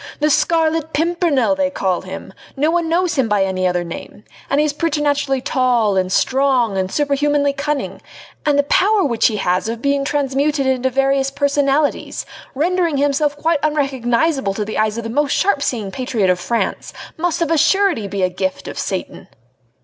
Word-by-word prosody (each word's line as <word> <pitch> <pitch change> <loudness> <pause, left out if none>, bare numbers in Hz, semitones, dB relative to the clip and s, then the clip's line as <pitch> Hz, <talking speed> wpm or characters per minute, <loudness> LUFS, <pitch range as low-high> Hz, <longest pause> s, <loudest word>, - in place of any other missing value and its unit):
The 300 0 +2
Scarlet 320 0 +1
Pimpernel 325 -5 +1
they 285 -1 0
call 190 -9 -1
him! 190 +1 -9 0.2
No 300 +4 +2
one 340 -1 0
knows 345 +1 +1
him 240 -4 +1
by 205 -2 +2
any 185 -1 0
other 180 -1 0
name! 170 +4 -9 0.3
and 280 - +2
he 300 - +3
is 295 - -1
preternaturally 290 -4 0
tall 245 -6 +1
and 185 -1 0
strong 260 -3 +2
and 190 0 -1
superhumanly 290 0 +1
cunning! 285 +1 -3 0.4
And 295 -1 +2
the 285 - +4
power 390 +7 +3
which 235 -5 +2
he 220 - -1
has 185 +1 0
of 230 0 -4
being 280 +2 0
transmuted 280 +1 0
into 260 0 +1
various 270 +1 +1
personalities 285 +1 0 0.3
rendering 340 +1 +1
himself 290 +1 +1
quite 320 0 +1
unrecognisable 270 -4 0
to 210 - -2
the 215 - -4
eyes 215 0 0
of 235 - -4
the 225 - -5
most 290 +3 +1
sharp 390 -7 +1
seeing 220 -8 -2
patriot 225 -6 0
of 180 - -1
France, 230 +6 -2 0.2
must 340 +1 0
of 330 - -2
a 330 - +3
surety 380 - +2
be 195 -1 -3
a 185 - +2
gift 190 +1 -3
of - - -6
Satan!" - - -4
275 Hz, 180 wpm, -18 LUFS, 225-300 Hz, 0.4 s, the